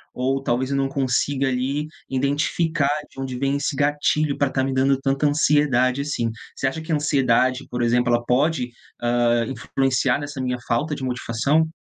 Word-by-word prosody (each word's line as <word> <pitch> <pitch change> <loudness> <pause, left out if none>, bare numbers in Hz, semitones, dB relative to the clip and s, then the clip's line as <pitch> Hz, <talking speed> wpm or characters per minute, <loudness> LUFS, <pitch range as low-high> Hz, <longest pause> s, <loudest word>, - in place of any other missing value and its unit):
ou 135 +2 0
talvez 130 +2 0
eu 140 - +1
não 135 0 0
consiga 135 0 0
ali 130 +3 -1 0.2
identificar 145 +3 0 0.2
de - - -13
onde 130 -2 -4
vem 140 +1 0
esse 145 0 -2
gatilho 145 +1 +1
pra 140 - +2
estar 130 0 0
me 135 0 -1
dando 135 +1 +2
tanta 135 +2 +1
ansiedade, 140 -3 +2
assim. 120 -6 -2 0.2
Você - - -3
acha 145 +4 -3
que 160 - -6
a - - +3
ansiedade, 135 -3 +2
por 125 0 -3
exemplo, 120 +1 +2
ela 120 0 +1
pode, 130 0 +1 0.3
hã, 120 0 +2
influenciar 130 +1 0
nessa 145 -1 -5
minha 125 -1 -1
falta 150 +6 0
de 135 - -7
motivação? 130 +5 +1
135 Hz, 180 wpm, -22 LUFS, 125-145 Hz, 0.3 s, a